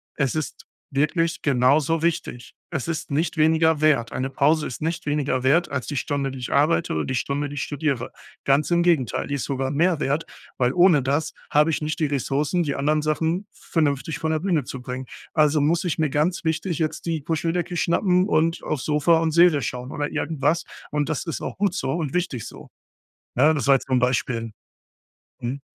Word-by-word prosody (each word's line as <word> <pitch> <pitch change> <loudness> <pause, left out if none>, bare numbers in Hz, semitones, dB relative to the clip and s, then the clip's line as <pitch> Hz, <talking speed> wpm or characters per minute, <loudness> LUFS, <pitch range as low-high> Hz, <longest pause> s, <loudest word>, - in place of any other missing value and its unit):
es 140 -4 0
ist 155 -4 -4 0.3
wirklich 165 +4 0
genauso 140 +4 +3
wichtig. 155 -7 -2 0.2
Es 155 -2 -3
ist 160 -2 -4
nicht 155 +3 0
weniger 160 0 +3
wert. 140 -7 +3
Eine 130 +1 -2
Pause 150 +2 +2
ist 125 - -7
nicht 165 +1 -2
weniger 140 -3 0
wert 155 +6 +3
als 130 -3 -2
die 145 - -3
Stunde, 140 0 -1
die 130 - -8
ich 125 - -5
arbeite 155 +4 +2
oder 80 - -1
die 130 - -2
Stunde, 140 +3 -1
die 145 - -7
ich 135 - -2
studiere. 145 -4 -2 0.3
Ganz 140 +4 +3
im 170 0 +3
Gegenteil, 160 -10 +1
die 145 - -2
ist 140 - -3
sogar 135 -1 -2
mehr 165 +3 +2
wert, 145 +2 0 0.3
weil 125 -1 +2
ohne 175 -6 +5
das 145 +4 -1 0.2
habe 150 +2 +4
ich 160 - -1
nicht 155 +2 -3
die 155 - +2
Ressourcen, 145 +5 0
die 145 -3 -2
anderen 150 +2 +1
Sachen 160 +6 -1
vernünftig 145 -2 -1
von 160 0 -1
der 155 - +1
Bühne 170 -4 0
zu 130 - -7
bringen. 125 +1 -5 0.3
Also 150 -1 +4
muss 165 +5 +2
ich 175 -3 -1
mir 155 -2 +2
ganz 170 +6 0
wichtig 160 +2 -1
jetzt 155 -1 -2
die 165 -2 -1
Puscheldecke 165 +3 -2
schnappen 180 +2 +2
und 165 -3 +1
aufs 150 -5 -3
Sofa 155 +2 +3
und 165 -1 0
Serie 170 -3 +5
schauen 125 +3 -4
oder 145 0 -2
irgendwas 165 +2 0 0.3
und 145 0 -1
das 155 - -2
ist 165 - -4
auch - - -5
gut 200 -2 +1
so 135 -6 -2
und 160 -5 -3
wichtig 160 - -2
so. - - -12 0.7
Ne, 150 +5 +4
das 140 - -2
war 140 - +6
jetzt - - -7
so 130 - +1
'n - - +4
Beispiel. 120 -2 0 0.9
Mhm. 125 +4 -4
150 Hz, 205 wpm, -23 LUFS, 135-165 Hz, 0.9 s, war